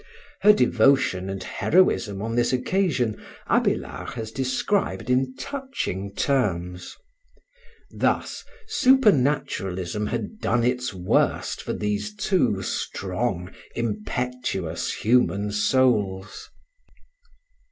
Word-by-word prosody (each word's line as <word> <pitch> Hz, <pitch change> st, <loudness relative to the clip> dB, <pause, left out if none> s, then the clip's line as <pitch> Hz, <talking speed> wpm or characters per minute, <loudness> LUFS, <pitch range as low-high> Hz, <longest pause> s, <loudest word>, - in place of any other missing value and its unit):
Her 210 Hz, +2 st, +8 dB
devotion 120 Hz, -, +3 dB
and 95 Hz, -1 st, -4 dB
heroism 115 Hz, -, +1 dB
on 115 Hz, +1 st, -3 dB
this 120 Hz, 0 st, +2 dB
occasion 130 Hz, -, 0 dB, 0.2 s
Abélard -, -, 0 dB
has 110 Hz, -2 st, -6 dB
described 130 Hz, -, -1 dB
in 130 Hz, +1 st, +1 dB
touching 130 Hz, -, -4 dB
terms. 90 Hz, -9 st, -1 dB, 1.0 s
Thus -, -, -1 dB, 0.2 s
supernaturalism 135 Hz, -, +2 dB
had 120 Hz, -, -4 dB
done 120 Hz, 0 st, +1 dB
its 125 Hz, +1 st, 0 dB
worst 90 Hz, -2 st, 0 dB
for -, -, -4 dB
these 105 Hz, -, -2 dB
two 175 Hz, -, +1 dB
strong, 95 Hz, -1 st, -3 dB, 0.2 s
impetuous 115 Hz, -5 st, -2 dB
human 105 Hz, -3 st, +1 dB
souls. 105 Hz, -4 st, +1 dB
120 Hz, 90 wpm, -24 LUFS, 100-135 Hz, 1.0 s, Her